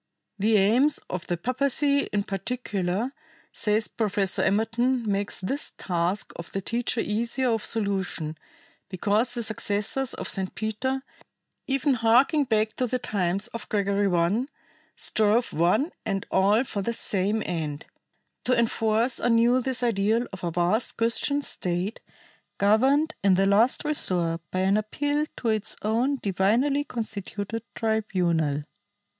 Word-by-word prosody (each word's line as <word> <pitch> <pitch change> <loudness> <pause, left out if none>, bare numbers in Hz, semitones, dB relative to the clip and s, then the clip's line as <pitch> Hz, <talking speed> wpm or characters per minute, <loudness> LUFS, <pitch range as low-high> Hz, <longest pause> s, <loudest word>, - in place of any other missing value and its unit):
The 215 +2 +4
aims 245 +9 +4
of 185 0 -4
the 175 - -1
papacy 280 - +2
in 205 -1 0
particular, 200 +1 -2 0.4
says 215 +1 0
Professor 200 -3 0
Emerton, 230 +4 +1
make 200 -1 -1
this 270 +10 -2
task 180 +2 -2
of 170 - -8
the 195 - -1
teacher 230 +3 -1
easier 235 +4 0
of 225 -2 0
solution, 190 -7 -1 0.5
because 210 +6 0
the 235 - -2
successors 220 +4 -1
of - - -5
St. 190 -2 -1
Peter, 260 +5 -2 0.6
even 275 +1 +2
harking 250 +6 +4
back 220 -3 +2
to 250 - +1
the 255 - 0
times 195 -4 -1
of 230 - -8
Gregory 200 -1 +1
I, 180 +9 +1 0.5
strove 220 +3 +1
one 180 - +2
and 195 -1 -2
all 205 +5 +4
for 205 -6 -4
the 235 +4 -2
same 205 0 0
end 155 -4 -3 0.6
"to 255 - +3
enforce 225 +1 +1
anew 240 +2 +3
this 255 0 -2
ideal 225 +1 +2
of 190 - -8
a 175 - 0
vast 175 +7 0
Christian 235 +5 +1
State, 180 +1 -3 0.6
governed 265 +10 +3
in 195 -2 +5
the 195 +1 +3
last 215 +9 +3
resort 175 - 0
by 185 - -1
an 195 +2 +3
appeal 290 +8 -1
to 235 - -1
its 215 -2 -1
own 235 +6 +1
divinely 225 +9 +2
constituted 220 -2 -4
tribunal." 180 -10 0
215 Hz, 135 wpm, -26 LUFS, 195-245 Hz, 0.6 s, in